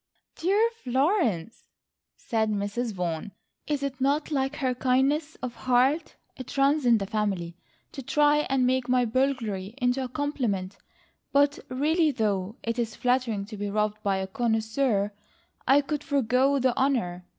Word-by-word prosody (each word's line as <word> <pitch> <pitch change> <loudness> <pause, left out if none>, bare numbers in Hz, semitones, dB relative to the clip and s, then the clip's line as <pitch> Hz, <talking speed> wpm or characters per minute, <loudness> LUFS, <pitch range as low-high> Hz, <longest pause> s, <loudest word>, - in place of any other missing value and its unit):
"Dear 400 +7 +2 0.2
Florence," 255 - 0 0.5
said 220 -1 -1
Mrs. 210 +3 -2
Vaughan, 180 0 -4 0.3
"is 290 -2 -1
it 270 -1 -4
not 285 +4 +1
like 270 0 0
her 260 -4 0
kindness 270 +5 +1
of 250 -2 -3
heart—it 260 +1 -1
runs 275 0 +3
in 235 -1 +6
the 200 - -3
family—to 195 +2 -5
try 295 +3 +3
and 265 -1 +2
make 255 0 +1
my 250 -1 +3
burglary 230 -5 -1
into 250 0 +1
a 255 - -5
compliment, 245 -10 -2 0.5
but 285 +1 +3
really 305 +5 +2
though 210 -5 -1
it 230 +1 -2
is 225 -2 -2
flattering 245 -5 0
to 215 0 -9
be 205 0 -3
robbed 210 +1 -1
by 200 -2 0
a 190 - -2
connoisseur 220 0 0 0.6
I 275 +3 +6
could 295 +1 -3
forego 270 0 +2
the 255 -2 +1
honour. 230 -10 0
250 Hz, 145 wpm, -27 LUFS, 215-275 Hz, 0.6 s, in